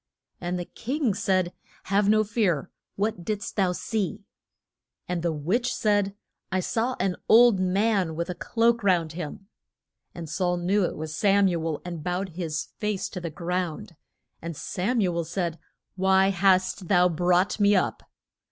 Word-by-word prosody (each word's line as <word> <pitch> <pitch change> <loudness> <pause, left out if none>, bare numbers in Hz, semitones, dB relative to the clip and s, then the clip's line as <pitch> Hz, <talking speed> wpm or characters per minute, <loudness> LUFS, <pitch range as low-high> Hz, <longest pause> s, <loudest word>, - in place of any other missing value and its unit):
And 180 +1 -2
the 175 - -4
king 255 - -2
said, 185 -2 0 0.3
Have 200 +1 +2
no 215 0 +5
fear. 205 - 0 0.2
What 200 -3 -1
did'st 210 +1 -3
thou 190 -3 +2
see? 205 +1 -3 0.8
And 180 -1 -2
the 170 0 0
witch 185 - 0
said, 205 -2 +1 0.4
I 185 - +1
saw 235 +6 -1
an 185 -1 0
old 230 -3 +7
man 185 -2 +1
with 170 +1 -2
a 180 - -3
cloak 235 +5 +1
round 175 -5 +2
him. 175 +3 -6 0.7
And 170 -2 -6
Saul 180 +2 0
knew 190 +4 +1
it - - -4
was 155 0 -5
Sam 200 +2 +4
u 170 -3 -1
el, 155 -2 -3
and 170 -3 -6
bowed 180 +3 -2
his 165 -2 -3
face 210 -2 -2
to 180 - -6
the 170 - -3
ground. 175 +3 -3 0.5
And 165 -2 -6
Sam 220 +6 -1
u 180 -3 +1
el 170 - 0
said, 170 0 -3 0.4
Why 190 0 +4
hast 185 -1 +2
thou 180 -1 +5
brought 180 +4 +1
me 205 0 +5
up? 185 - 0
185 Hz, 165 wpm, -26 LUFS, 175-205 Hz, 0.8 s, old